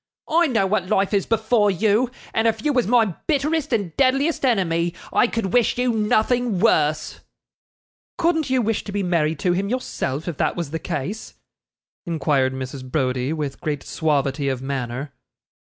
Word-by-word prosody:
'I 335 +2 +3
know 225 -8 +1
what 190 -2 0
life 195 +2 +1
is 200 -2 +1
before 220 -1 +2
you, 215 +5 +2 0.2
and 225 +1 +2
if 220 +2 -1
you 295 - +2
was 250 -5 +1
my 225 -5 +3
bitterest 300 0 0
and 200 -9 -1
deadliest 275 +4 +2
enemy, 175 -8 +1 0.2
I - - +4
could 225 -5 -3
wish 245 -1 +3
you 250 0 +2
nothing 220 0 +1
worse.' 155 -7 +1 1.0
'Couldn't 320 -4 +1
you 255 -2 +2
wish 225 0 -1
to 205 - -6
be 200 0 -1
married 165 -3 +1
to 180 - +2
him 195 +3 -1
yourself, 165 - -3
if 170 -5 -4
that - - 0
was 170 -5 -4
the 160 - -3
case?' 180 +10 -5 0.7
inquired 140 -5 +1
Mrs. 130 0 -6
Browdie, 130 -1 0
with 150 -4 -4
great 150 -2 -3
suavity 140 -3 0
of 130 -2 -2
manner. 135 0 -4
195 Hz, 170 wpm, -22 LUFS, 150-240 Hz, 1.0 s, I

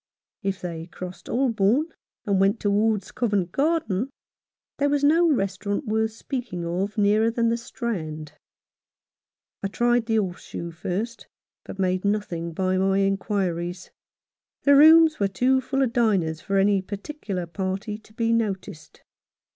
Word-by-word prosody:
If 195 -1 -2
they 165 -2 -6
crossed 180 0 -9
Holborn 245 - +2 0.4
and 200 -2 +1
went 195 +3 +3
towards 205 0 +1
Covent 205 -7 0
Garden, 275 - 0 0.7
there 285 0 +2
was 285 0 +1
no 325 +3 +5
restaurant 200 0 -1
worth 220 0 +1
speaking 230 -7 -5
of 190 +5 -2
nearer 210 +2 +3
than 230 0 +1
the 230 - +2
Strand. 160 - -5 1.3
I - - -1
tried 240 +2 +1
the 225 - +1
Horse 190 -5 -1
Shoe 170 0 -6
first, 200 +8 -4 0.4
but - - -8
made 185 -1 0
nothing 200 -5 -1
by 185 +2 0
my 195 0 +2
inquiries. 190 -3 -1 0.7
The 285 0 +6
rooms 315 +2 +7
were 200 - +2
too 255 +7 +2
full 270 +1 0
of 240 -3 -1
diners 195 - +1
for 195 - -1
any 195 0 +3
particular 200 - -5
party 190 +4 -4
to 215 - -22
be 230 0 0
noticed. 195 -8 -3
205 Hz, 140 wpm, -24 LUFS, 185-235 Hz, 1.3 s, rooms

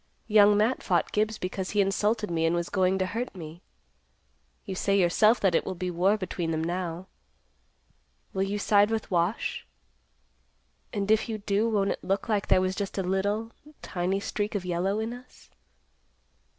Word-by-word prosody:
Young 210 -1 +5
Matt 220 +5 +1
fought 175 -3 0
Gibbs 215 +1 0
because 185 +1 -4
he 210 - -1
insulted 210 +1 +1
me 165 -1 0
and 165 - +1
was 170 0 -2
going 190 -1 +2
to 190 - 0
hurt 230 +4 -4
me. 165 -1 -9 1.0
You 195 - -4
say 200 +1 +1
yourself 215 +6 +4
that 195 -3 +3
it - - +2
will 190 - -4
be 180 +1 -3
war 185 +5 +2
between 180 -4 -3
them 160 0 -1
now? 175 +1 -3 1.3
Will 190 - -1
you 195 +1 -1
side 205 0 +4
with 225 -2 -3
Wash? 175 +4 0 1.3
And 200 0 -1
if 220 +1 +2
you 220 - -2
do, 210 +2 0
won't 200 -3 +1
it - - -5
look 195 +2 -1
like 210 -3 0
there 185 - +4
was 185 0 0
just 200 +1 -4
a 195 - 0
little, 205 +4 -1 0.3
tiny 185 +1 -1
streak 205 +2 -3
of 190 -3 -2
yellow 180 +3 0
in 225 +2 -3
us?" 250 +1 -15
195 Hz, 175 wpm, -27 LUFS, 180-210 Hz, 1.3 s, Young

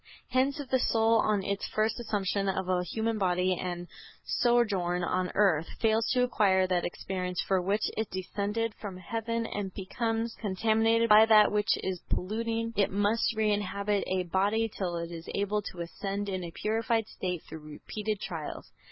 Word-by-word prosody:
Hence 265 +3 +1
if 285 - -5
the 260 - +4
soul, 225 -1 +3
on 210 -2 +1
its 200 0 -2
first 215 +2 0
assumption 200 -3 -1
of 190 -1 -2
a 180 -1 +1
human 220 +5 -2
body 180 -1 +2
and 175 0 -4 0.4
sojourn 200 -8 +2
on 180 +1 0
earth, 175 -6 +3
fails 225 0 +2
to 250 -1 +3
acquire 195 -6 +3
that 180 -1 0
experience 180 0 -3
for 190 -1 +2
which 200 +4 0
it 220 0 -2
descended 205 +4 -2
from 195 -4 -6
heaven 230 +5 -3
and 205 -3 -4
becomes 225 +3 -2
contaminated 225 +3 +2
by 215 0 +8
that 215 -1 +6
which 210 0 +2
is 185 -2 -3
polluting, 230 +3 -1
it 200 -1 +2
must 205 +4 +1
reinhabit 205 -1 0
a 185 0 0
body 200 +6 +1
till 185 -5 -3
it 170 0 -4
is 165 -1 -8
able 205 +1 0
to 180 -3 -7
ascend 200 +4 -4
in 185 -2 -3
a 170 - -5
purified 225 +4 0
state 180 -5 -4
through 160 - -8
repeated 205 +8 -5
trials." 165 -6 -6
205 Hz, 170 wpm, -29 LUFS, 185-225 Hz, 0.4 s, by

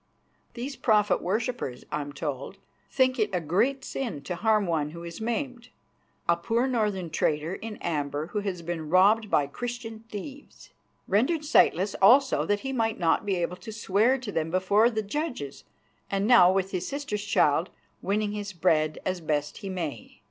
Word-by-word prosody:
These 260 +4 -5
Prophet 210 -3 +3
worshippers, 210 - -2
I 150 - -1
am 145 0 -6
told, 140 -2 -5 0.3
think 260 -1 +2
it 210 -1 +2
a 180 - +1
great 210 - 0
sin 225 - -4
to 180 - -4
harm 215 +2 +2
one 160 -4 0
who 170 +2 -9
is 170 +5 -8
maimed 245 +1 -3 0.6
a 170 - +4
poor 225 +8 0
northern 210 -9 -1
trader 150 +3 0
in 215 +1 -6
amber 145 -2 -2
who 210 - +1
has 190 -4 -4
been 165 -2 -4
robbed 205 +5 +4
by 145 - +3
Christian 225 - -6
thieves. 270 +8 -9 0.4
Rendered 270 - +1
sightless 195 - +3
also 260 +7 +5
that 205 0 +1
he 270 0 -3
might 225 -2 0
not 170 +3 +1
be 195 - +1
able 175 0 -2
to 220 - -9
swear 215 +4 +2
to 245 -5 -6
them 160 -3 -1
before 195 +6 +3
the 220 -2 -2
judges, 240 - -4 0.4
and 195 0 0
now, 210 -7 +7
with 190 0 0
his 185 -1 -3
sister's 275 -8 -3
child, 210 - +2 0.3
winning 205 +1 0
his 205 -1 -5
bread 160 -3 +2
as 185 -1 -2
best 150 -2 -2
he 195 - -6
may. 170 -6 -5
200 Hz, 175 wpm, -27 LUFS, 170-230 Hz, 0.6 s, now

